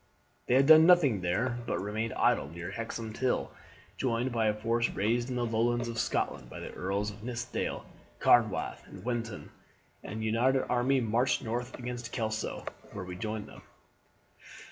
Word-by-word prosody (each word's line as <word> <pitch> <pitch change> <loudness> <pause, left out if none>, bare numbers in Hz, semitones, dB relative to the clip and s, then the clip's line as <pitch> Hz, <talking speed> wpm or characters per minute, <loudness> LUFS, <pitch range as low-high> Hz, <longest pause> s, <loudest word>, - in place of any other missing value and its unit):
They 125 - +3
had 135 +1 +6
done 160 +2 +9
nothing 145 - +5
there 115 +8 0
but - - 0
remained 110 +3 -2
idle 70 - +2
near 85 +3 -6
Hexham 115 0 -5
till, 130 +2 0 0.5
joined 125 0 0
by 115 -2 +1
a 105 - +3
force 115 +2 +1
raised 120 +5 0
in 125 - -2
the 120 -1 0
Lowlands 120 +1 +1
of 115 -1 -3
Scotland - - -1
by - - -8
the - - -7
Earls 100 +3 -2
of 105 +1 -13
Nithsdale, 120 +1 -3 0.3
Carnwath, 115 -4 +3
and - - -11
Wintoun, 115 -3 -3 0.5
the 105 - -7
united 115 +5 +2
army 125 +2 +2
marched 120 +3 +1
north 120 +2 -3
again 125 -1 -4
to 120 0 -7
Kelso, 110 -3 -3 0.3
where 95 - -5
we 90 0 -6
joined 105 +2 -4
them. - - -13
115 Hz, 165 wpm, -30 LUFS, 110-125 Hz, 0.5 s, done